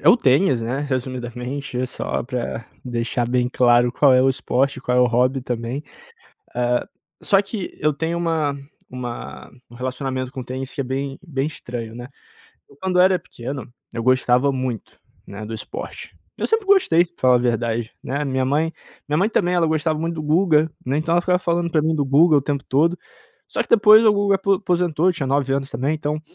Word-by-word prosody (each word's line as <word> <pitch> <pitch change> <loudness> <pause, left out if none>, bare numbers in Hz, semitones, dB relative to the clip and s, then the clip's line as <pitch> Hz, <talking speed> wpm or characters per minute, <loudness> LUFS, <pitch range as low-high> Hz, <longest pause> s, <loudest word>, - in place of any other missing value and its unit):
é - - +6
o - - +8
tênis, 135 - +3
né. 125 +5 -2
Resumidamente, 130 +1 -4
é 130 - 0
só - - -3
pra 120 -2 -4 0.2
deixar 120 0 -2
bem 125 0 +1
claro, 120 -1 +4
qual 140 -3 +4
é 130 - +5
o 135 - +4
esporte, 135 +1 0
qual 125 -1 0
é 125 - +5
o 125 - +5
hobby 125 +2 +1
também. 120 +3 -4 0.7
Ah, 120 0 0 0.4
só 195 -1 +4
que 200 -2 -6
eu 150 0 +2
tenho 165 +4 -2
uma 160 -4 0 0.3
uma 125 -2 -7 0.2
um - - -14
relacionamento 130 +1 -3
com 130 - -6
o - - -7
tênis 130 +1 -6
que 145 - -3
é - - -1
bem 135 +1 -4
bem 135 -3 -2
estranho, 120 -6 -6
né. 120 +1 -8 0.7
Quando 185 -1 +1
eu - - +7
era 185 0 +4
pequeno, 130 - -7 0.2
eu 115 - -3
gostava 130 +2 +3
muito, 130 -4 -4 0.3
né, 105 +2 -8
do 115 - -6
esporte. 110 - -7 0.2
Eu - - -1
sempre 445 -2 +1
gostei 370 - +4
pra 175 0 -29
falar 125 -1 +5
a - - +5
verdade, 120 -1 -1
né, 140 +3 -2
a - - -2
minha 130 -1 0
mãe 155 +4 0 0.3
minha 150 +1 0
mãe 200 +6 +2
também 180 -5 +1
ela 170 -2 +2
gostava 155 0 0
muito 165 +1 -2
do 155 - -4
Guga, 155 0 +3
né. 135 +3 0
Então, 160 +2 0
ela 175 - +3
ficava 180 0 +1
falando 170 -1 0
pra 155 -2 +3
mim 160 +1 +1
do 145 - 0
Guga 150 +4 +5
o - - +2
tempo 140 0 -2
todo, 165 +6 +2 0.5
só - - -1
que - - -17
depois 215 0 +7
o 215 - +6
Guga 200 -1 +2
apo 195 +1 +1
aposentou, 175 -3 +1
eu - - +5
tinha 150 -5 -3
9 135 0 +1
anos 135 0 -2
também. 135 +6 -1
Então, 150 0 -3
140 Hz, 210 wpm, -21 LUFS, 125-165 Hz, 0.7 s, o